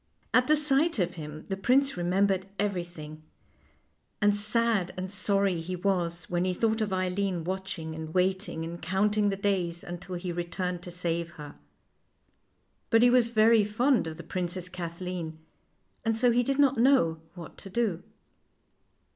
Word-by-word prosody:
At 255 0 +4
the 305 - +5
sight 300 +1 +3
of 180 -3 0
him 155 -2 -8
the 195 - -1
prince 270 +7 +2
remembered 190 +2 +1
every 200 -4 0
thing, 155 -3 -10 1.0
and 205 -1 +3
sad 215 -2 +1
and 185 +1 -4
sorry 195 -2 +1
he 180 +3 -4
was 175 -2 -1
when 175 0 0
he 185 0 0
thought 220 +2 +1
of 210 -2 -1
Eileen 185 -1 -1
watching 185 -3 -4
and 160 0 -6
waiting 185 -1 0
and 170 +1 -7
counting 205 +3 +1
the 195 - -1
days 185 -4 -1
until 175 +1 -7
he 175 0 -4
returned 175 +1 -3
to 180 - -8
save 170 -1 -3
her. 150 -4 -9 1.4
But 225 0 +5
he 245 - +6
was 245 -2 +5
very 225 -1 +5
fond 230 - +2
of 160 -1 -6
the 170 - -8
Princess 180 +1 -4
Kathleen, 175 -2 -5 0.7
and 225 0 0
so 245 +1 +4
he 240 +1 +3
did 270 +3 -1
not 275 -4 +4
know 200 - +4
what 170 -3 -10
to 195 - -9
do. 195 -5 0
185 Hz, 165 wpm, -28 LUFS, 175-215 Hz, 1.4 s, he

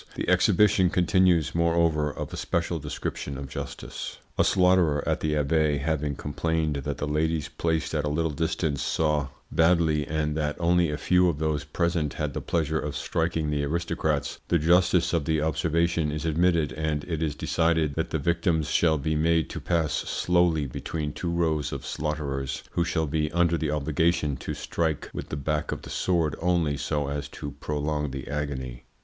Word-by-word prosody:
The - - -3
exhibition 105 -3 +4
continues, 90 -3 +3
moreover, 85 -2 +2
of - - -6
a - - -3
special - - -1
description 70 -1 -4
of 70 0 -6
justice. - - -6 0.2
A - - +3
slaughterer 90 -6 +3
at - - +1
the 75 -1 0
Abbaye 75 0 +2
having 75 0 -1
complained 80 +1 -1
that 70 - -3
the - - -3
ladies 80 +1 0
placed 80 -1 -1
at 75 -2 0
a - - -1
little 80 +2 0
distance 80 -2 -1
saw 75 -3 +1 0.2
badly, 80 -3 +3
and 75 -1 -1
that 75 -1 -1
only 85 -1 +3
a 75 - -2
few 90 +2 +3
of 80 - -2
those 75 -1 -1
present 85 -1 0
had - - -2
the - - -3
pleasure 80 -2 0
of 75 -1 -4
striking 80 -2 -1
the 75 -1 0
aristocrats, 75 -2 -1
the 85 - +3
justice 85 +1 +3
of 80 -4 +1
the 80 -1 +1
observation 80 +1 +1
is 75 +2 -4
admitted, 80 -1 +2
and 75 -1 -2
it 80 -3 -3
is 75 -2 -1
decided 80 -2 +1
that - - -2
the - - -1
victims 85 0 0
shall 80 -2 +3
be 80 +2 -1
made 80 +1 +2
to - - -5
pass 85 -3 0
slowly 85 -4 +1
between 75 +3 -4
two 85 - -3
rows 80 -3 0
of - - -5
slaughterers, 70 -3 -3
who 85 - +1
shall 80 -2 0
be 75 0 -1
under 85 0 +3
the 80 -2 -1
obligation 75 0 +1
to - - -5
strike 80 -3 -2
with - - -6
the 70 - -3
back 75 +2 -1
of - - -5
the - - -9
sword 85 -4 +1
only 85 -4 +2
so 75 0 -1
as 70 0 -3
to 70 - -7
prolong 75 0 -2
the 65 -1 -6
agony. 70 -4 -4
80 Hz, 180 wpm, -26 LUFS, 75-85 Hz, 0.2 s, exhibition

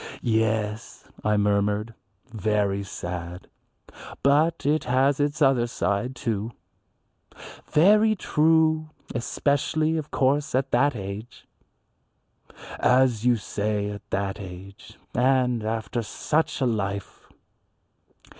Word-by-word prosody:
"Yes," 110 -2 -1 0.2
I 105 0 +2
murmured, 105 +2 +1 0.3
"very 105 -4 -1
sad. 90 -2 -6 0.8
But 155 +4 +2
it 150 +2 +1
has 130 +3 +2
its 145 +1 +1
other 130 -3 +3
side, 120 +2 -2
too." 115 -2 -3 1.1
"Very 210 +7 +4
true, 160 -2 +2 0.2
especially, 150 +6 0
of 155 -1 -4
course, 140 +2 +1
at 135 +1 0
that 140 +2 +3
age." 105 +4 -7 1.3
"As 125 -3 +3
you 125 - +5
say 105 -1 -2
at 105 - -10
that 100 0 -2
age, 100 +4 -11 0.2
and 125 -2 +2
after 110 +1 -2
such 150 +8 -1
a - - +3
life." 100 -4 -3
120 Hz, 100 wpm, -25 LUFS, 105-140 Hz, 1.3 s, you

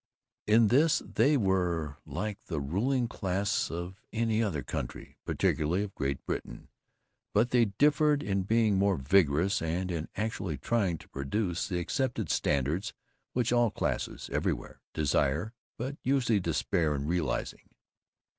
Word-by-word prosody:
In 110 0 +5
this 150 +6 +4
they 145 +1 +3
were 90 - 0
like 95 +8 -4
the 80 -4 -2
ruling 120 - 0
class 100 -2 -1
of 85 +3 -6
any 115 -1 +1
other 85 - -1
country, - - -6
particularly 85 +6 +1
of 100 -2 -6
Great 70 -1 -3
Britain, - - -5 0.7
but 115 +4 +3
they 120 -2 +5
differed 145 +7 +3
in 100 -1 0
being 110 0 +2
more 100 -1 +3
vigorous 80 +4 +3
and 90 +3 -1
in 80 -2 -3
actually 100 -7 -2
trying 95 - 0
to - - -16
produce 85 +6 -2
the 90 - -2
accepted 120 - -1
standards 75 - 0 0.4
which 120 -1 +1
all 120 -1 +4
classes, - - -3
everywhere, - - -2
desire, 75 - +1 0.2
but 135 +4 -4
usually 125 -5 +2
despair 85 -2 0
of 70 0 -3
realizing. 80 -5 -2
95 Hz, 135 wpm, -30 LUFS, 80-115 Hz, 0.7 s, In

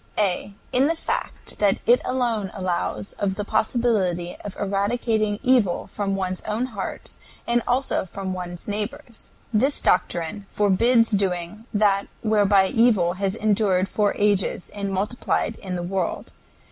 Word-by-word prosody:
A. 200 0 0 0.2
In 260 +3 +3
the 330 - +1
fact - - -4
that 205 -2 +3
it 245 +2 +5
alone 235 -6 -1
allows 175 - -2
of 195 -2 0
the 205 +1 -3
possibility 210 -6 0
of 205 - -7
eradicating 205 +1 0
evil 245 -9 +3
from 200 -2 -2
one's 185 -1 -2
own 220 +4 -1
heart, 200 -2 -6 0.3
and 235 0 +2
also 255 -4 +1
from 190 0 -4
one's 175 -1 -5
neighbor's. 225 +4 -5 0.2
This 265 +7 +2
doctrine 180 +3 0
forbids 230 +4 +3
doing 195 +1 -1
that 205 -2 +2 0.2
whereby 205 -3 +4
evil 225 -8 +3
has 195 +1 -1
endured 205 -4 +2
for 205 0 +1
ages 205 -3 +1
and 200 -1 -3
multiplied 210 +3 -1
in 185 -2 -5
the 175 - -3
world. 185 0 -3
205 Hz, 140 wpm, -24 LUFS, 190-225 Hz, 0.3 s, it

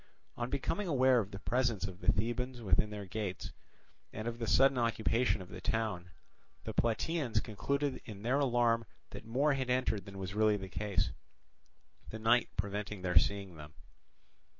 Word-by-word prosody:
On 120 0 -3
becoming 165 +8 -1
aware 130 -5 +4
of 100 -3 -2
the 100 - -7
presence 120 -1 0
of 95 -2 -7
the - - +3
Thebans 120 +4 -2
within 100 +2 +3
their 105 -1 -6
gates, 95 0 -4 0.6
and 110 +2 -5
of 120 0 -4
the 115 - -2
sudden 135 +1 +5
occupation 115 -3 +1
of 90 - -15
the 95 - -8
town, 105 -5 -1 0.5
the - - -5
Plataeans 120 +1 +1
concluded 140 +7 -2
in 105 -2 -9
their 130 +5 +2
alarm 120 -4 +2 0.3
that - - -9
more 135 +6 +2
had 130 -2 -2
entered 125 -6 +1
than 100 -1 -9
was 95 -1 -5
really 105 0 +3
the 95 -1 -7
case, 100 -1 -1 1.0
the 110 - -6
night 115 +2 +3
preventing 100 0 -3
their 90 -2 +6
seeing 100 -2 -2
them. 75 0 -11
110 Hz, 170 wpm, -33 LUFS, 100-125 Hz, 1.0 s, their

